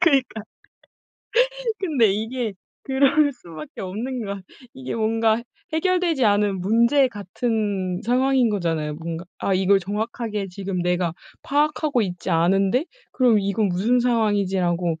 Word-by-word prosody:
그니까. 270 - +2 1.4
근데 270 - +2
이게 225 0 -3 0.3
그럴 280 +2 +3
수 175 -10 -14
밖에 155 -1 -9
없는 225 +6 -4
건 200 -1 -5 0.3
이게 130 0 -6
뭔가 225 0 +1 0.3
해결되지 340 -5 +1
않은 205 -2 +2
문제 235 +7 +3
같은 205 -3 -2
상황인 255 0 +2
거잖아요. 165 -6 -1
뭔가 165 +2 -6
'아. 195 - 0
이걸 195 +1 +4
정확하게 210 +1 -3
지금 185 -1 -4
내가 180 -1 0 0.3
파악하고 295 -2 +1
있지 180 -1 -4
않은데 195 - +2 0.3
그럼 240 -5 +3
이건 200 +1 0
무슨 205 +8 +2
상황이지?' 210 -6 +1
라고 175 -1 0
210 Hz, 280 characters per minute, -23 LUFS, 185-250 Hz, 1.4 s, 이걸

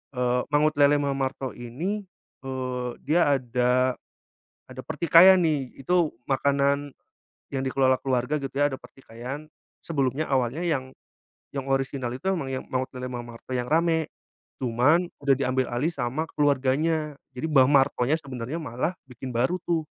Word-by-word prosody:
eee, 125 0 +1
Mangut 150 +1 +3
Lele 145 +1 +6
Mbah 140 - 0
Marto 135 -1 -2
ini, 170 - -4 0.4
eee, 130 -1 -3
dia 160 +5 +2 0.2
ada 125 +1 +1 0.7
ada 130 0 -9
pertikaian 170 +5 +6
nih. 140 -5 -1
Itu 165 -3 +1
makanan 140 +1 +1 0.7
yang 135 - 0
dikelola 130 -1 +2
keluarga 130 +1 0
gitu 135 - -3
ya, 145 - +4
ada 145 - -2
pertikaian. 125 +3 -9 0.3
Sebelumnya 140 -1 -1
awalnya 135 +4 0
yang 130 -5 -1 0.6
yang 135 -1 -4
orisinal 135 -2 -1
itu 160 +10 -2
emang 165 -8 -2
yang 130 - -3
Mangut 130 0 -1
Lele 125 0 -5
Mbah 120 -1 -5
Marto 115 - -15
yang 125 -1 -1
rame. 160 0 +2 0.5
Cuman 145 +9 +3
udah 140 -1 +4
diambil 130 -1 0
alih 145 +8 +1
sama 130 +1 -2 0.2
keluarganya. 145 +2 +1 0.2
Jadi 130 +5 -3
Mbah 135 -4 +6
Martonya 135 -1 +3
sebenarnya 130 0 -5
malah 130 +7 -2 0.2
bikin 125 0 -7
baru 130 +10 +1
tuh, 165 -2 +1
135 Hz, 145 wpm, -26 LUFS, 125-150 Hz, 0.7 s, Lele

